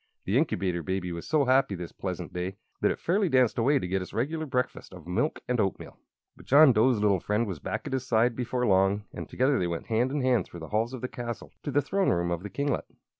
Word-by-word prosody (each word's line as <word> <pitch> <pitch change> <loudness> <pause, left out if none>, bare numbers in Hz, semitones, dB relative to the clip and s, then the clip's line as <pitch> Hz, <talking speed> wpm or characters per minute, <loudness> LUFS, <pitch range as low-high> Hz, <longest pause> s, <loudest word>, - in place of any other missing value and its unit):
The 100 - 0
Incubator 95 - +1
Baby 90 +2 -3
was 85 0 -6
so 150 -3 +2
happy 130 -5 +3
this 85 -2 -7
pleasant - - -5
day 90 +2 -4 0.2
that - - +3
it - - -1
fairly 190 +2 +1
danced 130 -4 +3
away 140 +5 +3
to 90 - -2
get 95 +1 -1
its 90 - -8
regular 155 +7 -1
breakfast 125 -7 -3
of 90 - -12
milk 90 - -1
and 125 -1 0
oatmeal. 95 -2 -2 0.4
But - - -17
John 140 0 +7
Dough's 115 +2 +4
little 100 -3 +3
friend 105 +6 0
was 95 -7 -5
back - - -4
at - - -4
his 130 -1 -2
side 115 +1 +3
before 125 0 -1
long, 95 0 +3
and - - -7
together 130 +2 +2
they 90 - 0
went 85 -1 -4
hand 120 +3 +1
in 145 0 -1
hand 125 -6 +2
through 85 - -11
the 80 - -8
halls 115 +4 0
of 125 - -9
the 125 - -2
castle 120 -2 -6
to - - -5
the 145 0 +2
throne 195 +6 +1
room 85 0 +1
of 85 -1 -2
the 105 - -6
kinglet. 140 +4 -1
115 Hz, 250 wpm, -28 LUFS, 95-130 Hz, 0.4 s, John